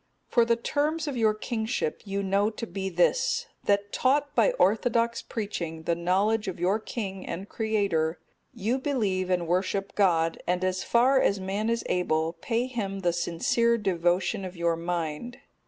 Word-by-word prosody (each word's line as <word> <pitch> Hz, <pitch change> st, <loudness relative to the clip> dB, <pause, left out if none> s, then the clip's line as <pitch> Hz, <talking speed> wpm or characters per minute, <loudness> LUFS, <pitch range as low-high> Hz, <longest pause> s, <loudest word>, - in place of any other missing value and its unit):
For 235 Hz, -2 st, +4 dB
the 235 Hz, 0 st, +3 dB
terms 300 Hz, +6 st, -1 dB
of 285 Hz, -, -2 dB
your 220 Hz, -3 st, +2 dB
kingship 220 Hz, -5 st, -2 dB
you 200 Hz, 0 st, -2 dB
know 200 Hz, +2 st, +2 dB
to 225 Hz, +1 st, -6 dB
be 190 Hz, -1 st, -4 dB
this, 470 Hz, -, +2 dB, 0.2 s
that 200 Hz, 0 st, +1 dB
taught 285 Hz, +2 st, +2 dB
by -, -, +4 dB
orthodox 230 Hz, -, +2 dB
preaching 170 Hz, -7 st, -4 dB
the 170 Hz, -, +1 dB
knowledge 195 Hz, +6 st, +1 dB
of 185 Hz, -2 st, -4 dB
your 190 Hz, +5 st, +2 dB
King 195 Hz, -4 st, -5 dB
and 190 Hz, +4 st, -5 dB
Creator, 200 Hz, -9 st, 0 dB, 0.3 s
you 235 Hz, +2 st, -1 dB
believe 205 Hz, -10 st, 0 dB
and 175 Hz, -2 st, 0 dB
worship 190 Hz, +3 st, -1 dB
God, 165 Hz, -5 st, +2 dB
and 180 Hz, +1 st, 0 dB
as 185 Hz, 0 st, 0 dB
far 260 Hz, +3 st, +4 dB
as 200 Hz, -, +2 dB
man 195 Hz, +4 st, -2 dB
is 230 Hz, 0 st, 0 dB
able, 160 Hz, -2 st, 0 dB
pay 230 Hz, +8 st, -1 dB
Him 200 Hz, -6 st, -4 dB
the 175 Hz, -2 st, +1 dB
sincere 175 Hz, +7 st, +1 dB
devotion 185 Hz, +1 st, 0 dB
of 185 Hz, -1 st, -7 dB
your 170 Hz, 0 st, +1 dB
mind. 170 Hz, +6 st, -3 dB
200 Hz, 165 wpm, -27 LUFS, 180-230 Hz, 0.3 s, For